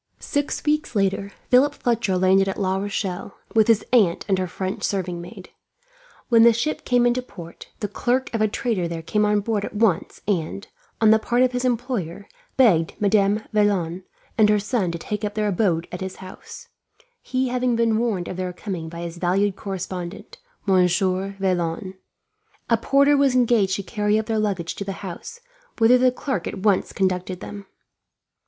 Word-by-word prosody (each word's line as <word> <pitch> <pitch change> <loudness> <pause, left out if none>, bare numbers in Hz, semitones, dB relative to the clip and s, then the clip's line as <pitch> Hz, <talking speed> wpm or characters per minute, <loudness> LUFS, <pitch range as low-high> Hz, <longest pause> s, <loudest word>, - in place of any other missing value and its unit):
Six 285 0 -2
weeks 300 -4 0
later, 195 0 0 0.2
Philip 275 +3 +4
Fletcher 230 -6 0
landed 190 +1 +4
at 190 - -4
La 190 -1 0
Rochelle, 195 -1 -4 0.2
with 220 -2 +4
his 225 -2 +3
aunt 200 -9 +3
and 190 -2 +1
her 185 - -1
French 185 +1 -4
serving 180 -3 -2
maid. 180 +2 -11 0.8
When 230 -2 +5
the 235 0 +7
ship 305 +7 -2
came 245 -1 +3
into 245 +1 +2
port, 175 -9 -11
the 205 - -1
clerk 245 +6 -1
of 225 - -1
a 215 - +4
trader 210 -4 -1
there 165 -1 -5
came 210 +5 +1
on 210 0 +2
board 210 -1 -1
at - - -6
once 205 -5 +1
and, 195 0 -2 0.3
on 220 -1 +5
the 220 - +5
part 240 +3 +1
of 255 - +2
his 250 0 -2
employer, 235 -7 -2 0.3
begged 180 -11 +4
Madame 205 0 +2
Vaillant 190 -4 +1 0.4
and 210 -1 +6
her 210 - +4
son 205 -3 -1
to 170 - -4
take 210 +6 -5
up 210 0 -3
their 215 -1 0
abode 175 -4 0
at 180 - -6
his 190 0 -5
house; 185 -1 -11 0.5
he 260 0 -1
having 250 -1 0
been 230 -1 +2
warned 215 -7 -1
of 185 - -6
their 185 -1 -3
coming 175 -4 -5
by 170 +1 -8
his 170 0 -6
valued 190 +3 +1
correspondent, 185 -2 -6 0.3
Monsieur 190 +1 +2
Vaillant. 185 0 -1 0.8
A - - +7
porter 280 +5 +3
was 275 -2 +3
engaged 230 -6 +3
to 200 - -4
carry 210 +1 0
up 220 - -1
their 220 -1 -1
luggage 190 -5 -1
to - - -5
the 195 0 -4
house, 325 - -8 0.4
whither 240 +2 +5
the 255 0 +4
clerk 250 - -3
at - - -5
once 205 -3 +2
conducted 185 -1 -1
them. 200 -1 -9
205 Hz, 185 wpm, -23 LUFS, 185-230 Hz, 0.8 s, the